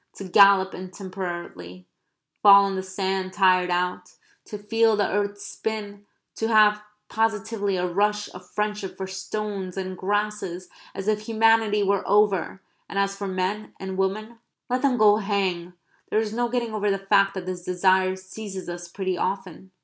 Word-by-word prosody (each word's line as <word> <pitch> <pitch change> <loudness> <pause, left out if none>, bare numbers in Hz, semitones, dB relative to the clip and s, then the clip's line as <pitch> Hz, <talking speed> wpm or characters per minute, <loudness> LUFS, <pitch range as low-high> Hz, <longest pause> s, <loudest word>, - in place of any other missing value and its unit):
To - - -8
gallop 195 0 +5
intemperately; 180 - -7 0.6
fall 200 -1 +8
on 195 -1 -2
the 190 - -2
sand 190 0 -3
tired 185 -2 +3
out; 180 0 -2 0.3
to 210 - -7
feel 225 +2 +2
the 205 -1 +1
earth 205 0 -2
spin; 205 0 -6 0.3
to 225 - -1
have 210 -2 +5 0.3
positively 220 -2 -1
a 180 - 0
rush 205 +3 0
of 180 0 -12
friendship 210 -2 -3
for 190 - -4
stones 190 0 -5
and 185 -1 -4
grasses, 195 -2 -2 0.3
as 195 +1 -5
if 215 0 0
humanity 225 -2 +3
were 200 0 +1
over, 200 -3 +2 0.3
and - - -5
as 195 0 +1
for 200 0 -5
men 190 +3 -3
and 190 0 -5
women, 215 +4 -2 0.3
let 250 +1 +1
them 265 -3 +2
go 210 -1 +5
hang 190 -4 -1 0.4
there - - 0
is 220 -1 -2
no 240 +1 0
getting 235 -2 -2
over 210 -1 0
the 195 - +1
fact 195 0 +2
that 185 -2 -5
this 185 -1 -5
desire 185 +1 +2
seizes 190 +1 -8
us 175 0 -6
pretty 185 0 -3
often. 190 -1 -4
195 Hz, 165 wpm, -24 LUFS, 185-210 Hz, 0.6 s, fall